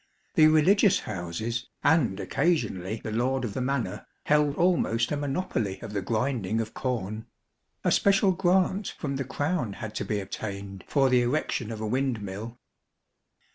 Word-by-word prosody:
The 155 - +7
Religious 180 +6 +4
Houses, 110 +6 -4 0.2
and 125 - +3
occasionally 110 - 0
the 110 - -4
Lord 125 +3 0
of 105 - -4
the 130 - -2
Manor, 125 -7 -2 0.2
held 150 -1 +3
almost 150 -10 +2
a - - +1
monopoly 140 - -2
of 105 - -7
the 100 - -1
grinding 115 -2 -1
of 110 -1 -3
corn. 110 -4 -3 0.6
A - - +2
special 195 -1 +4
grant 185 +2 +1
from 140 -3 -3
the 135 - -1
Crown 145 - -2
had 110 0 -7
to - - 0
be 105 - -1
obtained 100 -1 -6
for 140 -2 +3
the 125 -1 +4
erection 120 -3 -1
of 110 -1 -6
a - - -2
windmill. 115 -2 -2
120 Hz, 155 wpm, -27 LUFS, 105-150 Hz, 0.6 s, The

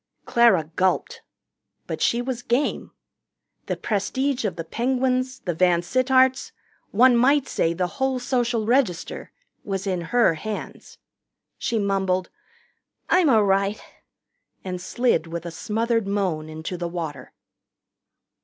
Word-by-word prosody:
Clara 235 -8 +4
gulped. 410 - 0 0.6
But - - -5
she 235 +1 +2
was 250 -1 -4
game. 245 +4 -1 0.8
The - - -2
prestige 255 +5 -1
of 190 -5 -1
the 165 - -5
Penguins, 255 +5 -1
the 175 - -2
VanSittarts 255 +10 +2 0.4
one 245 +4 +5
might 270 +3 +3
say 165 - 0
the 180 +1 0 0.2
whole 265 -1 +1
Social 245 -3 0
Register 230 -7 0 0.3
was 195 -1 -3
in 185 -3 -1
her 240 -7 +4
hands. 210 +7 -7 0.6
She 230 - -1
mumbled, 190 -3 0 0.8
"I'm 360 -5 +5
a' 220 -4 +5
right," 195 +1 +1 0.8
and 180 -1 -5
slid 210 -4 0
with 170 +1 -6
a 170 - -5
smothered 225 +4 -1
moan 185 -6 -1
into 160 +3 -6
the 175 0 -3
water. 165 -4 -6
215 Hz, 125 wpm, -23 LUFS, 180-255 Hz, 0.8 s, one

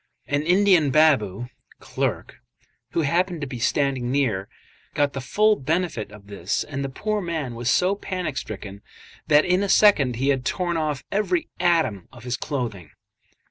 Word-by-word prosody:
An 145 0 0
Indian 180 -2 +4
baboo 125 -7 +2 0.3
(clerk), - - -3 0.6
who 165 - +1
happened 175 +3 0
to - - -2
be 130 -3 -7
standing 130 0 0
near, 115 -9 0 0.5
got 145 -1 +1
the 135 - -4
full 215 - +3
benefit 155 - -2
of 105 -1 -14
this, 100 -2 -2
and 140 -1 -5
the 135 - -3
poor 210 +10 -2
man 160 -8 -3
was 120 +1 -2
so 185 +6 +3
panic 185 -6 -4
stricken 100 -3 -7 0.5
that 150 0 +5
in 180 +2 +2
a 200 - -1
second 150 - +5
he 135 +4 0
had 135 -2 +1
torn 175 +6 -1
off 150 -4 -2
every 315 - 0
atom 160 - +1
of 120 -3 -14
his 125 0 -2
clothing. 120 - -4
145 Hz, 165 wpm, -23 LUFS, 120-175 Hz, 0.6 s, that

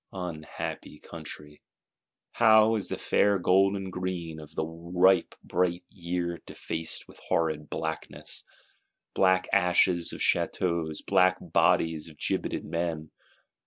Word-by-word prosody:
Unhappy 85 -5 -6
country! 75 0 -10 0.7
How 110 -1 +5
is 105 -4 0
the - - -3
fair 100 -1 +2
gold 95 +2 +3
and 95 -1 -5
green 90 -3 -4
of 75 0 -12
the - - -1
ripe 90 +3 +2
bright 90 0 0
Year 85 -2 -3
defaced 80 0 -5
with - - -14
horrid 80 -2 0
blackness: 80 0 -4 0.7
black 95 -1 +3
ashes 90 -2 +3
of - - -7
Châteaus, 85 -3 0
black 95 -2 +4
bodies 80 -1 +1
of 75 - -16
gibetted - - -2
Men! 85 -2 -3
85 Hz, 120 wpm, -28 LUFS, 80-95 Hz, 0.7 s, How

